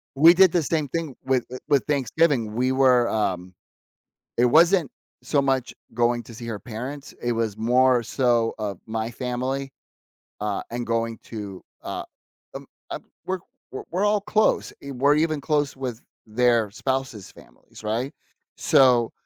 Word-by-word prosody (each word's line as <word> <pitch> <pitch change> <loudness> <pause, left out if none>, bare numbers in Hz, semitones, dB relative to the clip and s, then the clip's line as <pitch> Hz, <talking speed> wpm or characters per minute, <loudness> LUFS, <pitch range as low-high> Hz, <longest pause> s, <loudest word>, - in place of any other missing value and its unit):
We 165 +5 +8
did 185 -1 +6
the 175 -3 +1
same 155 0 0
thing 160 -4 -3
with 130 -2 +1
uh, - - -4
with 140 -4 +3
Thanksgiving, 140 -5 +1
we 130 +2 +1
were, 130 -3 +4
um, 95 -4 -2 0.8
it 120 +1 +4
wasn't 165 +3 +4 0.3
so 140 +3 +1
much 135 -2 0 0.2
going 120 0 +1
to 115 - -12
see 120 0 -8
her 110 -3 -4
parents, 130 +6 -7
it 120 0 0
was 115 -2 -1
more 125 +2 +3
so 120 -2 +1
of 100 -4 -4
my 110 +1 -3
family, 130 +3 -3 0.7
uh, 105 -1 -2
and 120 0 -4
going 115 0 -1
to, 100 -4 -7 0.2
uh, - - -5 0.5
um, - - -8 0.2
uh, - - -3 0.3
we're 190 0 -1 0.3
we're 130 - -6
we're 185 +4 0
all 210 0 +3
close, 215 +2 +1
e 140 - -7
we're 140 +3 +3
even 155 -1 +1
close 145 -3 0
with 125 -3 -5 0.3
their 115 -1 +2
spouses' 130 -4 -3
families, - - -17
right? 115 +7 -2 0.4
So, 130 -6 +4
125 Hz, 155 wpm, -24 LUFS, 115-140 Hz, 0.8 s, We